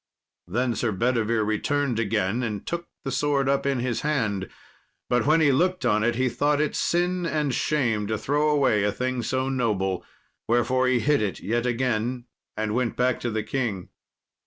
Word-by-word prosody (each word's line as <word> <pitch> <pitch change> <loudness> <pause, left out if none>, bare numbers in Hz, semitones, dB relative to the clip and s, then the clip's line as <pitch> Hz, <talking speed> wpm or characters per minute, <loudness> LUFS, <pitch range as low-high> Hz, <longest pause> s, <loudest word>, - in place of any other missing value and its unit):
Then 120 +6 0
Sir 115 -1 -1
Bedivere 115 +1 +1
returned 125 +3 0
again, 110 0 0
and 105 -5 -3
took 170 0 -4 0.2
the 135 - -3
sword 140 0 +1
up 140 0 +1
in 135 -3 0
his 125 -1 -1
hand; 110 -11 -1 0.6
but 125 +2 +2
when 160 +2 +4
he 145 -3 +5
looked 180 +6 +1
on 105 0 +2
it, 120 +1 +1
he 130 +2 +1
thought 145 +5 +1
it 150 0 0
sin 180 +1 0
and 150 -4 0
shame 115 -8 0
to 110 0 -1
throw 145 +7 +1
away 135 -8 +3
a 105 - +2
thing 125 +3 -2
so 130 +2 -1
noble. 105 -8 0 0.4
Wherefore 125 +2 +2
he 125 -2 +2
hid 145 0 +2
it 105 -3 -2
yet 120 +3 -1
again, 120 0 -1 0.3
and 110 0 -1
went 120 -1 0
back 125 0 +1
to 120 - -2
the 110 -1 -2
king. 110 -6 -3
125 Hz, 185 wpm, -25 LUFS, 110-140 Hz, 0.6 s, he